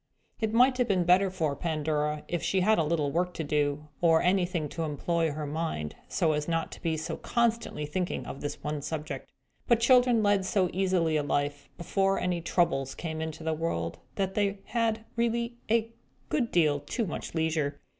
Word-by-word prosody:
It 220 -1 0
might 250 +3 +4
have 250 - +3
been 185 -4 +2
better 185 +3 +4
for 160 -6 -1
Pandora 150 -1 -1
if 175 - -2
she 190 - +1
had 195 - +2
had 220 - +5
a - - +3
little 150 -2 0
work 180 +2 0
to 160 - -2
do, 145 0 0
or 165 -2 +5
anything 180 -3 +1
to 165 - -5
employ 165 +2 0
her 150 +1 -4
mind 145 - -3
upon, - - -26
so 160 - +2
as 150 -1 -1
not 165 -1 -1
to - - -10
be 160 -2 0
so 155 - -4
constantly 230 -9 0
thinking 180 +4 -2
of 135 - -7
this 145 0 -5
one 150 -1 -2
subject. 155 +1 -5 0.4
But 235 -3 +4
children 245 -1 +5
led 205 -1 +3
so 185 -1 +1
easy 180 -4 +2
a - - +2
life, 145 0 -2
before 195 +2 +1
any 180 -1 -1
Troubles 135 -6 +1
came 160 -2 -4
into 160 0 -5
the 160 0 0
world, 155 - -2 0.2
that 190 -1 -1
they 200 -1 +1
had 225 -2 0
really 235 0 0
a 230 0 +2 0.4
great 250 -6 0
deal 150 -4 +3
too 230 - -2
much 170 - -5
leisure. 160 -3 0
170 Hz, 195 wpm, -29 LUFS, 150-200 Hz, 0.4 s, had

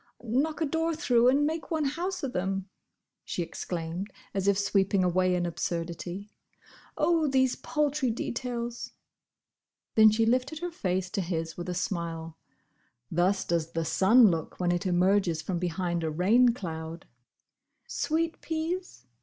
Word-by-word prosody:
"Knock 275 +8 0
a - - +3
door 325 +2 0
through 245 -6 +3
and 285 +3 +3
make 320 +2 -3
one 315 -3 0
house 350 +6 -2
of 265 - -2
them!" 190 +1 -2 0.6
she 175 - -2
exclaimed, 170 +3 -5 0.2
as 195 0 -1
if 200 -1 +4
sweeping 195 -1 +2
away 180 0 +2
an 175 -1 0
absurdity. 175 +3 -4 0.7
"Oh, 320 0 +3
these 260 -2 +2
paltry 295 -3 0
details!" 240 0 -4 1.0
Then 220 -1 +8
she 220 +1 +2
lifted 255 +6 +1
her 350 +2 -4
face 185 - -2
to 205 - -1
his 165 -2 -3
with 175 +1 -6
a 180 - -2
smile. 165 -3 -3 0.8
Thus 185 +4 +2
does 165 -1 -1
the 165 0 -1
sun 210 +7 +6
look 165 -2 -4
when 175 -1 +1
it 175 +2 -1
emerges 180 -2 +2
from 180 -3 -2
behind 175 -1 -1
a 160 - 0
rain 205 +10 +4
cloud. 165 -7 -5 0.8
"Sweet 330 +1 -1
peas? 325 - -4
195 Hz, 145 wpm, -28 LUFS, 175-265 Hz, 1.0 s, Then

